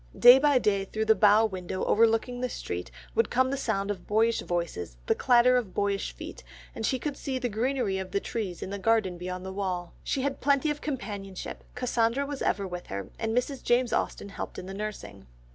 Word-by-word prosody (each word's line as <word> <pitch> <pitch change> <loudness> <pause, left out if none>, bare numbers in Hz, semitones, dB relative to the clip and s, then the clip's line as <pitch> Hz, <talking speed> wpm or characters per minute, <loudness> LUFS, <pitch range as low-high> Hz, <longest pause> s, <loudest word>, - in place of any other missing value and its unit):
Day 245 +2 +9
by 290 -1 +4
day 200 -5 +1
through 220 +3 -2
the 220 - +6
bow 210 +2 +5
window 185 -2 -4
overlooking 230 +3 +2
the 250 - -1
street, - - -5 0.2
would 460 - +2
come 260 +1 +2
the - - 0
sound 205 -6 -1
of 185 -3 -7
boyish 225 +2 +2
voices, 170 - -3
the - - +3
clatter 250 0 +5
of 220 -7 -3
boyish 200 -1 0
feet, - - -9 0.3
and 225 - -6
she 260 - +1
could 290 +2 -3
see 270 -2 -3
the 250 -1 -1
greenery 230 -3 0
of 190 -1 -5
the 200 - 0
trees 200 -5 -4
in 190 - -6
the 200 - -4
garden 195 -4 +1
beyond 180 +1 -5
the 190 - -5
wall. 185 -3 -3
She 265 - -1
had 280 -1 -2
plenty 280 +2 +3
of 295 - -5
companionship, 205 -9 -5
Cassandra 250 +1 +1
was 285 -1 -5
ever 200 - 0
with 180 -1 -7
her, 100 0 -5
and 225 +1 -1
Mrs. 260 +1 -1
James 240 0 +2
Austen 200 - -1
helped - - -6
in - - -6
the 190 - -7
nursing. 210 - -6
220 Hz, 210 wpm, -28 LUFS, 190-250 Hz, 0.3 s, Day